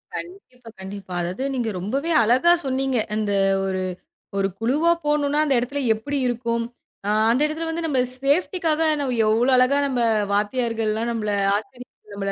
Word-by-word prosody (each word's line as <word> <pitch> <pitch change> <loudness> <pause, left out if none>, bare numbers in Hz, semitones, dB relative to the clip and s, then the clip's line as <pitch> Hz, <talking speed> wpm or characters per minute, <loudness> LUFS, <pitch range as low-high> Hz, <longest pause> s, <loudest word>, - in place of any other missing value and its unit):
கண்டிப்பா, 335 -10 -9
கண்டிப்பா. 190 -1 -8
அதாவது 180 +8 -3
நீங்க 240 -3 -1
ரொம்பவே 275 - -2
அழகா 255 +10 +4
சொன்னீங்க 265 -1 0 0.2
அந்த 210 -2 -1 0.3
ஒரு, 190 -1 -2 0.6
ஒரு 195 - +2
குழுவா 290 +9 +2
போனோனா 295 0 +1
அந்த 275 - +2
எடத்துல 280 +4 -3
எப்படி 280 +6 -4
இருக்கும். 235 -1 -1 0.4
அ - - +1 0.2
அந்த 255 - +1
எடத்துல 320 +2 -3
வந்து 330 +1 -3
நம்ம 270 -4 0 0.2
சேஃப்டிக்காக 320 +2 +1 0.5
எவ்ளோ 230 +5 +3
அழகா 255 +3 +4
நம்ம 255 -2 -1 0.3
வாத்தியார்கள்ளா. 225 +1 0
நம்ல 215 -3 -2 0.2
ஆசிரிய 250 +4 -6 0.3
நம்மள 195 0 -3
250 Hz, 140 wpm, -23 LUFS, 215-285 Hz, 0.6 s, அழகா